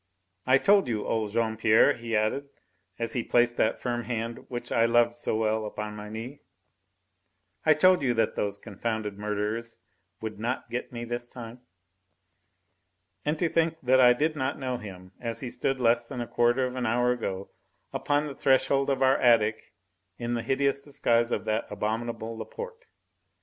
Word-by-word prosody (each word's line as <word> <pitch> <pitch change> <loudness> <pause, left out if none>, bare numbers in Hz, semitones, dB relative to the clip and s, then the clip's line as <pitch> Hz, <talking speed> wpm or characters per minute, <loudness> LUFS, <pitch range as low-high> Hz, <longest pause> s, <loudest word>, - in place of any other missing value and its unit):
"I 130 +1 +6
told 200 +6 +4
you, 110 -3 -2
old 110 -2 -1
Jean 110 +1 0
Pierre," 110 0 +5
he 115 -1 -4
added, 125 +7 -1 0.5
as 115 -1 -3
he 125 - 0
placed 120 0 +2
that 110 - +1
firm 120 -1 -2
hand 115 -1 -4
which 120 -1 -5
I 115 - +4
loved 120 0 +4
so 120 -2 -2
well 110 0 +1
upon 105 0 -5
my 105 0 -8
knee, 115 +6 -7 1.3
"I 155 - +7
told 185 0 +5
you 125 -3 +1
that 115 - +1
those 100 -1 -2
confounded 105 -1 -4
murderers 105 +2 -3 0.4
would 110 -2 -6
not 120 +4 -3
get 125 - -4
me 120 -1 -5
this 120 0 -4
time." 120 0 -9 1.6
And 150 +2 0
to 170 - +1
think 165 0 +1
that 130 +1 +4
I 125 -1 +8
did 155 +5 0
not 130 -1 -2
know 130 -2 -2
him, 95 -4 -10
as 115 -1 -3
he 130 - -4
stood 135 -1 -1
less 120 -1 +2
than 125 -1 -6
a 120 - -2
quarter 120 +3 +2
of 125 0 -4
an 125 -2 -1
hour 120 +2 +2
ago 100 -6 -4 0.4
upon 145 +1 +1
the 145 - -5
threshold 135 +1 +2
of 135 -1 +1
our 130 0 +5
attic 110 -3 +3 0.5
in 120 0 -3
the 120 - -1
hideous 140 +3 -1
guise 115 0 +3
of - - -1
that 110 +1 -1
abominable 115 +2 -3
Laporte. 470 - -8
120 Hz, 175 wpm, -27 LUFS, 110-130 Hz, 1.6 s, I